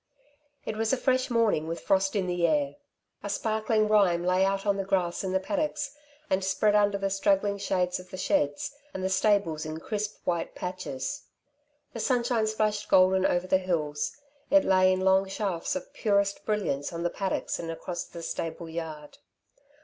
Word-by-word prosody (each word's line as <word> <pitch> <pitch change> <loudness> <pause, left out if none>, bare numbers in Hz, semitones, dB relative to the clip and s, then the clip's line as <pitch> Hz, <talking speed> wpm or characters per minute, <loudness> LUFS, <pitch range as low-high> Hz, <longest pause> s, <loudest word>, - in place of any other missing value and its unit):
It 220 - -3
was 225 0 +1
a 265 - +2
fresh 255 0 +1
morning 225 -10 +2
with 165 +1 -3
frost 195 +1 +1
in 195 -2 +1
the 175 -1 +1
air. 145 -3 0 0.4
A 205 - -5
sparkling 215 +1 +1
rime 190 -5 +3
lay 185 +1 +3
out 195 +1 0
on 200 -1 +2
the 195 - -1
grass 185 -2 0
in 190 - -2
the 190 - +2
paddocks 290 +6 -2 0.3
and 190 0 +1
spread 200 +2 +2
under 205 -1 +3
the 195 0 -2
straggling 200 +1 +1
shade 180 -2 0
of 180 0 -12
the 185 - -7
sheds 145 - 0 0.2
and 185 - -3
the 190 - +1
stables 195 -6 +2
in 155 +1 -5
crisp 210 +3 -4
white 170 -2 -1
patches. 180 - -5 0.7
The 230 - -6
sunshine 240 -2 +1
splashed 215 -1 -1
golden 185 0 +5
over 175 +1 0
the 185 0 +3
hills; 155 -5 -2 0.3
it 295 0 +5
lay 185 -1 +5
in 185 0 0
long 190 +1 +4
shafts 195 +3 -2
of 280 0 -6
purest 200 -6 +1
brilliance 200 -10 -1
on 170 0 -4
the 175 - 0
paddocks 195 -1 -2
and 165 - -5
across 175 +2 -4
the 170 - -10
stable 165 0 -4
yard. 160 -3 -7
190 Hz, 180 wpm, -28 LUFS, 175-210 Hz, 0.7 s, golden